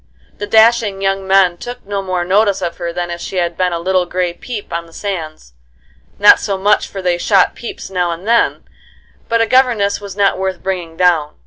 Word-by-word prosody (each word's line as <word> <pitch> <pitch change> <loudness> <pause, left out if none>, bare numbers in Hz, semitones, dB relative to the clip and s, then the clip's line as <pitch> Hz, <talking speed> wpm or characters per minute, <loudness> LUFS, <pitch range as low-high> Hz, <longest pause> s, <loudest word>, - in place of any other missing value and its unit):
The 205 - -4
dashing 220 -2 +3
young 195 0 -1
men 190 -2 +3
took 245 +4 -8
no 200 0 -3
more 185 -2 -2
notice 195 +1 +2
of 170 -1 -3
her 170 -1 -4
than 175 0 -4
if 170 0 -6
she - - -6
had 175 -2 -1
been 180 0 0
a 170 - -2
little 180 +1 0
gray 180 -1 -1
peep 210 +3 -8
on 170 0 -4
the 165 - -19
sands; 160 - -6 0.6
not 205 - +7
so 195 -2 -2
much, 205 +2 +2
for 195 -1 -8
they 175 -1 0
shot 195 0 +3
peeps 235 -4 -8
now 180 -2 0
and 170 +4 -6
then, 235 0 +2 0.7
but 230 0 +2
a - - +3
governess 230 -6 +2
was 200 -2 -8
not 195 -2 +2
worth 190 -1 -3
bringing 175 -4 -4
down. 170 -5 +2
190 Hz, 210 wpm, -16 LUFS, 175-205 Hz, 0.7 s, not